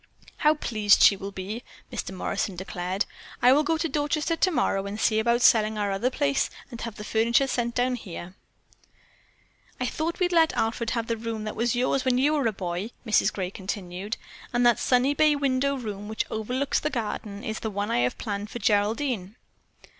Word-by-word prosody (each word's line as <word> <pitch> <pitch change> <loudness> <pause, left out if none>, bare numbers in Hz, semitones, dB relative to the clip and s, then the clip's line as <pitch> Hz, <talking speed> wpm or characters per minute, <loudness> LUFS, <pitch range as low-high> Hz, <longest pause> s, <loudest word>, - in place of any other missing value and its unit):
"How 305 +1 +4
pleased 215 -8 +3
she 200 - +8
will 195 +1 -6
be," 200 +5 -6 0.3
Mr. - - -4
Morrison 190 +1 -2
declared. 185 +2 -2 0.3
"I 250 +1 +6
will 290 - +4
go 320 +2 +1
to 330 +1 0
Dorchester 300 +2 0
tomorrow 250 - +1
and 205 +2 -5
see 220 -1 +3
about 235 +2 +2
selling 215 -1 +5
our 205 -1 0
other 195 +6 +1
place 280 +1 +1 0.2
and 235 - -7
have 230 -3 -5
the 210 - -8
furniture 230 +5 +2
sent 240 -3 -1
down 250 +1 +2
here." 180 -4 -8 1.5
"I 250 - 0
thought 320 +7 -2
we'd 360 -1 +2
let 325 -2 +4
Alfred 225 +1 0
have 230 - -1
the 230 0 -2
room 225 -1 -4
that 215 - -4
was 235 +1 +1
yours 255 +2 +1
when 255 -1 +2
you 285 +4 +3
were 285 -6 +2
a - - +2
boy," 185 +1 -4 0.2
Mrs. 220 - +3
Gray 185 -2 -3
continued, 190 +1 -5 0.3
"and 240 0 +2
that 240 -2 +5
sunny 255 +2 +3
bay 300 +1 +4
window 280 0 +1
room 210 -4 -6
which 220 +1 -2
overlooks 250 +6 -1
the 300 - -1
garden 210 -4 -4
is 220 0 -3
the 220 - -3
one 205 +1 -2
I - - +2
have 125 +1 0
planned 205 -2 -4
for - - -6
Geraldine." 215 0 0
230 Hz, 195 wpm, -26 LUFS, 205-260 Hz, 1.5 s, she